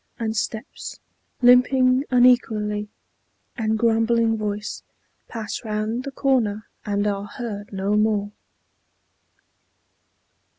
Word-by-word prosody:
and 220 Hz, -1 st, -2 dB
steps 220 Hz, +4 st, -4 dB, 0.4 s
Limping 255 Hz, +2 st, +5 dB
unequally, 220 Hz, -4 st, +3 dB, 0.7 s
and 220 Hz, -3 st, 0 dB
grumbling 225 Hz, 0 st, +2 dB
voice, 210 Hz, -1 st, -4 dB, 0.5 s
Pass 225 Hz, 0 st, -5 dB
round 220 Hz, +3 st, -2 dB
the 275 Hz, -, -4 dB
corner, 235 Hz, -6 st, 0 dB, 0.2 s
and 205 Hz, -1 st, -1 dB
are 200 Hz, -1 st, -1 dB
heard 205 Hz, -2 st, -6 dB
no 195 Hz, +1 st, -1 dB
more. 210 Hz, -1 st, +1 dB
220 Hz, 90 wpm, -23 LUFS, 210-245 Hz, 0.7 s, Limping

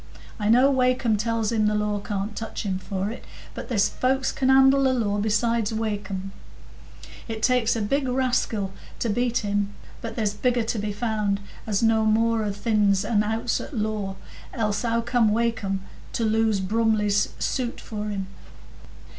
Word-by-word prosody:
I 210 Hz, 0 st, 0 dB
know 255 Hz, +5 st, +6 dB
Wakem 255 Hz, -3 st, +2 dB
tells 225 Hz, +1 st, 0 dB
him 215 Hz, -2 st, +2 dB
the 210 Hz, -, +1 dB
law 210 Hz, -1 st, 0 dB
can't 200 Hz, +1 st, -4 dB
touch 225 Hz, +1 st, -5 dB
him 190 Hz, -3 st, -2 dB
for 195 Hz, +1 st, -3 dB
it, 240 Hz, -, -9 dB, 0.3 s
but -, -, -7 dB
there's 210 Hz, -5 st, +3 dB
folks 265 Hz, +1 st, 0 dB
can 260 Hz, -1 st, 0 dB
handle 270 Hz, +1 st, +6 dB
the 265 Hz, -1 st, +3 dB
law 205 Hz, -4 st, 0 dB
besides 220 Hz, +1 st, +1 dB
Wakem. 205 Hz, -3 st, -3 dB, 1.0 s
It 220 Hz, -1 st, -5 dB
takes 250 Hz, -3 st, +3 dB
a 225 Hz, -, -1 dB
big 275 Hz, +6 st, 0 dB
raskil 250 Hz, -6 st, 0 dB, 0.3 s
to 235 Hz, -, -1 dB
beat 240 Hz, 0 st, 0 dB
him; 205 Hz, 0 st, -1 dB, 0.3 s
but 230 Hz, -, -6 dB
there's 215 Hz, -3 st, 0 dB
bigger 245 Hz, +2 st, +1 dB
to 225 Hz, 0 st, -2 dB
be 210 Hz, 0 st, -2 dB
found, 210 Hz, -2 st, -1 dB, 0.3 s
as 210 Hz, 0 st, 0 dB
know 225 Hz, -1 st, +4 dB
more 225 Hz, +1 st, +2 dB
o' 210 Hz, -, -1 dB
th' 205 Hz, +3 st, -11 dB
ins 205 Hz, -3 st, +3 dB
and 210 Hz, -3 st, +2 dB
outs 225 Hz, +2 st, -1 dB
o' -, -, -6 dB
the 290 Hz, -, -10 dB
law, 210 Hz, -3 st, -2 dB, 0.4 s
else 210 Hz, -4 st, 0 dB
how 230 Hz, -1 st, +1 dB
came 235 Hz, -2 st, +2 dB
Wakem 215 Hz, -4 st, 0 dB, 0.3 s
to 230 Hz, -, -1 dB
lose 220 Hz, -2 st, +2 dB
Brumley's 210 Hz, 0 st, +2 dB
suit 250 Hz, -3 st, -2 dB
for 210 Hz, -1 st, -5 dB
him?" 195 Hz, -2 st, -3 dB
220 Hz, 175 wpm, -25 LUFS, 205-235 Hz, 1.0 s, know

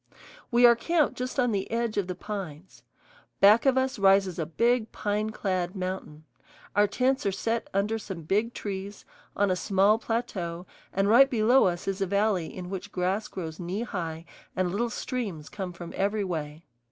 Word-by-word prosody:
We 245 Hz, 0 st, +5 dB
are 235 Hz, 0 st, +8 dB
camped 320 Hz, +4 st, +1 dB
just 255 Hz, +2 st, -4 dB
on 245 Hz, -2 st, +3 dB
the 195 Hz, -2 st, -2 dB
edge 230 Hz, -1 st, -1 dB
of 200 Hz, -3 st, 0 dB
the 180 Hz, -, -4 dB
pines. 185 Hz, -4 st, -7 dB, 0.6 s
Back 210 Hz, +6 st, +6 dB
of 265 Hz, -1 st, +4 dB
us 260 Hz, -3 st, 0 dB
rises 195 Hz, -2 st, +4 dB
a 160 Hz, -, -2 dB
big 230 Hz, +6 st, +1 dB
pine 210 Hz, +1 st, -1 dB
clad 185 Hz, -3 st, -2 dB
mountain; 185 Hz, -5 st, -5 dB, 0.5 s
our 205 Hz, 0 st, +5 dB
tents 260 Hz, +5 st, +1 dB
are -, -, +2 dB
set 225 Hz, +4 st, -2 dB
under 210 Hz, +3 st, 0 dB
some 190 Hz, -5 st, -7 dB
big 210 Hz, +8 st, 0 dB
trees, 200 Hz, 0 st, -6 dB, 0.3 s
on 200 Hz, -1 st, +2 dB
a -, -, +2 dB
small 195 Hz, +4 st, +3 dB
plateau, 185 Hz, -8 st, -3 dB, 0.3 s
and 195 Hz, +1 st, +1 dB
right 260 Hz, +6 st, +7 dB
below 240 Hz, +2 st, +4 dB
us 175 Hz, -1 st, -1 dB
is 195 Hz, 0 st, -2 dB
a 195 Hz, -, +1 dB
valley 200 Hz, -3 st, +1 dB
in 180 Hz, 0 st, -7 dB
which 195 Hz, +1 st, -6 dB
grass 190 Hz, +4 st, -1 dB
grows 160 Hz, -4 st, -7 dB
knee 185 Hz, +5 st, -3 dB
high 165 Hz, -7 st, -5 dB, 0.3 s
and 185 Hz, -1 st, 0 dB
little 235 Hz, +5 st, 0 dB
streams 210 Hz, -, -4 dB
come 195 Hz, -3 st, -5 dB
from 175 Hz, -1 st, -9 dB
every 205 Hz, +2 st, 0 dB
way. 160 Hz, -3 st, -5 dB
200 Hz, 180 wpm, -27 LUFS, 180-225 Hz, 0.6 s, are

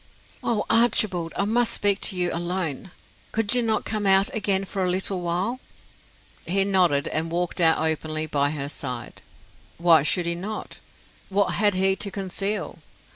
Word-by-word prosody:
"Oh, 220 Hz, -3 st, -1 dB
Archibald, 210 Hz, -7 st, +3 dB
I 200 Hz, -, +1 dB
must 230 Hz, +2 st, +2 dB
speak 200 Hz, -1 st, +2 dB
to 190 Hz, -, -1 dB
you 175 Hz, -1 st, 0 dB
alone! 175 Hz, -1 st, -3 dB, 0.4 s
Could 225 Hz, -1 st, +1 dB
you 250 Hz, -, +3 dB
not 225 Hz, -2 st, -1 dB
come 215 Hz, -2 st, -2 dB
out 195 Hz, +6 st, +4 dB
again 195 Hz, -3 st, 0 dB
for 195 Hz, 0 st, -3 dB
a 180 Hz, -, 0 dB
little 185 Hz, 0 st, 0 dB
while?" 180 Hz, +8 st, -2 dB, 0.9 s
He 195 Hz, +3 st, +3 dB
nodded, 180 Hz, -8 st, +2 dB
and 160 Hz, +1 st, -2 dB
walked 175 Hz, +1 st, -2 dB
out 160 Hz, -1 st, +5 dB
openly 155 Hz, 0 st, -1 dB
by 145 Hz, -2 st, 0 dB
her 145 Hz, -2 st, -4 dB
side. 125 Hz, -5 st, -7 dB, 0.6 s
Why 170 Hz, -2 st, +5 dB
should 170 Hz, +4 st, +1 dB
he 170 Hz, -, 0 dB
not? 200 Hz, +5 st, -6 dB, 0.5 s
What 200 Hz, 0 st, +1 dB
had 205 Hz, -2 st, +2 dB
he 190 Hz, +1 st, +2 dB
to 200 Hz, -, -1 dB
conceal? 195 Hz, -2 st, -3 dB
185 Hz, 165 wpm, -24 LUFS, 165-205 Hz, 0.9 s, out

